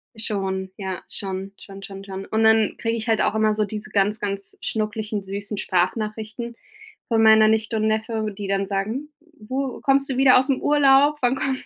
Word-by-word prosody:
Schon, 195 -4 -3
ja, 190 -3 -5
schon, 195 0 -5
schon, 195 0 -11
schon, 195 0 -9
schon. 195 0 -7
Und 220 0 0
dann 220 -1 +4
kriege 230 0 -1
ich 225 +2 -3
halt 225 -2 +2
auch - - +1
immer 215 0 +3
so 215 0 0
diese 210 +1 -7
ganz, 205 +2 +1
ganz 200 -1 -5
schnuckeligen 215 -1 -3
süßen 200 +2 -5
Sprachnachrichten 215 +6 -2 0.5
von 225 -2 +2
meiner 220 0 +7
Nichte 220 +1 +1
und 215 0 +1
Neffe, 220 -1 -1
die 200 -1 -5
dann 195 0 0
sagen: 215 +9 -3 0.3
„Du, 260 +4 -4
kommst 275 0 +2
du 260 - -2
wieder 260 -1 +6
ausm 265 +1 0
Urlaub? 290 0 +4
Wann 250 +1 +2
kommt?", 265 -1 -2
215 Hz, 185 wpm, -23 LUFS, 200-235 Hz, 0.5 s, meiner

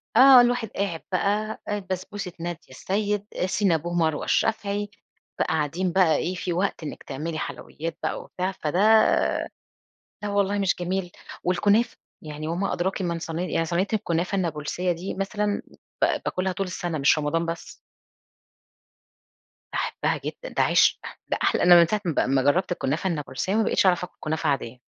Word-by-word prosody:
آه، 265 -1 +9
الواحد 245 -2 +1
قاعد 190 -5 -3
بقى، 210 +4 0
آآ، 205 0 -1
بسبوسة 185 +1 -4
نادية 170 -1 -4
السيد، 205 +8 -2 0.2
Cinnabon 180 -4 +1
مروة 160 -3 +1
الشافعي، 205 -2 0 0.5
بقى - - +2
قاعدين 160 +3 0
بقى 175 -4 +4
إيه، 185 +4 -1
في 180 0 -2
وقت 185 -1 -1
إنّك 150 - -7
تعملي 155 +4 -4
حلويّات 165 +1 -5
بقى - - -2
وبتاع 185 +1 -3
فده 175 -2 -2 1.4
لا 210 - -2
الله 200 +1 -1
مش 195 -2 +2
جميل. 180 0 -2 0.3
والكنافة، 205 +6 +2 0.2
يعني 155 0 -6
وما 175 +4 -1
أدراكِ 190 +2 -1
من 170 -2 -1
صين 165 0 -4
يعني 175 -2 0
صينية 175 +4 0
الكُنافة 180 -2 0
النابلسية 170 0 -1
دي، 175 +3 -4
مثلًا 205 +2 -1 0.4
ب - - +6 0.2
باكلها 185 +1 -1
طول 195 +2 -2
السنة، 175 -2 -3
مش 140 +2 +4
رمضان 160 +3 0
بس. 165 0 -5 2.0
باحبها - - -1
جدًا، - - -7
ده - - +1
عشق، - - +4 0.3
ده - - 0
أحلى - - +2
أنا 175 0 +8
من 170 - +6
ساعة 210 +2 -1
ما 170 - +1
ب - - +1
ما 135 0 +3
جرّبت 155 +8 +2
الكُنافة 165 +2 -1
النابلسية، 160 +4 -2
ما 225 - +3
بقيتش 205 - +2
أعرف 180 -1 +3
أكل 180 - -9
كنافة 155 0 -1
عاديّة. 125 -3 -2
180 Hz, 160 wpm, -25 LUFS, 165-200 Hz, 2.0 s, آه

